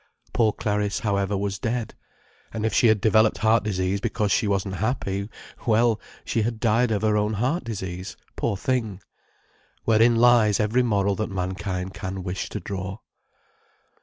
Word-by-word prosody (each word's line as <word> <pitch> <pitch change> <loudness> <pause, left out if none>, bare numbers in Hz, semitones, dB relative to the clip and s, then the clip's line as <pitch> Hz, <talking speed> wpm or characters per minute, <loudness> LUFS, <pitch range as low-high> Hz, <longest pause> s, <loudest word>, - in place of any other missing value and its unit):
Poor 110 -2 +3
Clariss, 105 -2 -1
however, 100 -1 0
was 100 -1 -2
dead—and 115 -1 -6
if 110 - 0
she 120 - +4
had 110 -1 +4
developed 110 0 +4
heart 110 +1 +3
disease 95 -1 -1
because 105 -2 -1
she 110 - +2
wasn't 100 -1 -1
happy, 100 -3 -2 0.4
well, 115 0 +3 0.2
she 115 - 0
had 115 +1 -2
died 115 +2 +2
of 110 -1 -1
her 110 -1 +3
own 105 +1 +1
heart 130 - 0
disease, 95 -5 -6 0.2
poor 100 - -1
thing. 110 -5 -1 0.9
Wherein 115 +1 +4
lies 115 -3 +5
every 110 +4 +2
moral 100 -4 +1
that 110 - -2
mankind 95 0 -3
can 95 0 -5
wish 90 0 -4
to 105 - -4
draw. 95 +1 -5
105 Hz, 155 wpm, -24 LUFS, 100-115 Hz, 0.9 s, lies